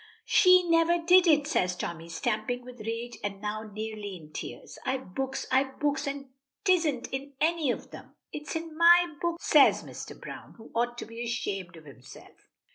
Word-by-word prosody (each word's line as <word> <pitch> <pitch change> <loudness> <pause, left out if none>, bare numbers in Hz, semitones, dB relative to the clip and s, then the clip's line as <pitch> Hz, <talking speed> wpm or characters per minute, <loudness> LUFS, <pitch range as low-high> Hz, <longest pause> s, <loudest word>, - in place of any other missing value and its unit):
"She 365 -1 +6
never 335 +1 +4
did 355 +2 +5
it," 295 -3 +5
says 180 - 0
Tommy 170 -1 -5
stamping 235 +6 -2
with 250 -1 -11
rage 230 +2 -5
and 200 -1 -3
now 215 +1 -4
nearly 215 -1 -5
in 155 -2 -16
tears. - - -8
"I've 260 -7 -3
books 270 +2 -3
I've 265 +1 +1
books, 285 -1 0
and 275 -1 -5 0.4
'tisn't 330 -9 +2
in 275 +1 -5
any 320 -2 +1
of - - -3
them." - - -12 0.2
"It 300 0 -7
is - - -3
in 325 -1 -5
my 345 0 +6
book," 340 -1 -1
says 300 -4 +5
Mr. - - -9
Browne, - - -10
who 225 - -14
ought 240 +1 0
to - - -5
be 230 +1 -7
ashamed 195 -7 -3
of 160 - -15
himself. 135 -3 -15
260 Hz, 185 wpm, -28 LUFS, 215-320 Hz, 0.4 s, She